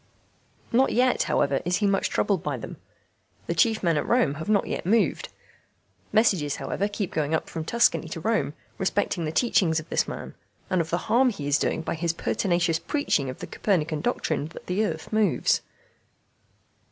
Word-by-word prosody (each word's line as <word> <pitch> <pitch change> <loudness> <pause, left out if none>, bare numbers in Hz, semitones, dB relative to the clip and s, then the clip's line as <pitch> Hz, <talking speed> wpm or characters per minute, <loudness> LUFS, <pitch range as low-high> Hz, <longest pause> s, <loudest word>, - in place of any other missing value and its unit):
Not 260 +3 +3
yet, 250 +1 +3
however, 140 -1 +1
is 175 +1 0
he 210 - 0
much 195 -1 +1
troubled 195 -5 +1
by 145 -3 -2
them. 115 - -8 0.7
The - - -1
chief 220 +6 +2
men 165 -3 +2
at - - -1
Rome 235 - +3
have 160 - -5
not 205 -2 +3
yet - - -3
moved. 215 +5 +1 0.8
Messages, 190 -10 +2
however, 140 +9 -2
keep 205 -2 -4
going 155 0 0
up - - -2
from 160 - -5
Tuscany 235 -5 +2
to 165 - -5
Rome 215 -5 0 0.2
respecting 190 -3 0
the 155 - -2
teachings 165 -4 +2
of 160 - -10
this - - +1
man, - - -7 0.4
and 185 -2 +3
of 165 - -5
the 175 +1 -2
harm 255 +2 +4
he 150 -11 -5
is 145 +1 +3
doing 160 - -1
by - - -2
his 165 0 -1
pertinacious 170 -1 0
preaching 215 - 0
of 130 - -6
the - - -4
Copernican 160 -6 -1
doctrine 155 - -1
that 165 - -12
the 185 +4 0
earth 160 -1 -4
moves. 215 -5 +2
175 Hz, 185 wpm, -26 LUFS, 155-215 Hz, 0.8 s, harm